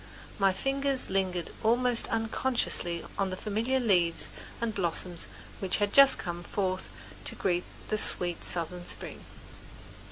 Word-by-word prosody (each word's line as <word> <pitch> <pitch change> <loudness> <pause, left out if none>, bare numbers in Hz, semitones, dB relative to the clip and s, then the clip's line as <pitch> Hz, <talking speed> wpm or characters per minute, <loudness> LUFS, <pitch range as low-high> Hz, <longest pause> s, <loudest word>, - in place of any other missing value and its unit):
My 195 -1 +5
fingers 270 +6 -1
lingered 185 -3 0
almost 240 +1 +3
unconsciously 225 -6 0
on 195 -1 +2
the 185 - -4
familiar 225 +6 0
leaves 175 -8 +2 0.3
and 235 -2 -1
blossoms 175 -2 -1 0.3
which 190 -2 0
had 205 -1 0
just 275 -1 +8
come 175 -1 -4
forth 185 0 -2 0.4
to - - -1
greet 180 -2 0 0.2
the 215 - +1
sweet 175 -4 +1
southern 175 +1 -3
spring. - - -7
195 Hz, 130 wpm, -30 LUFS, 175-230 Hz, 0.4 s, just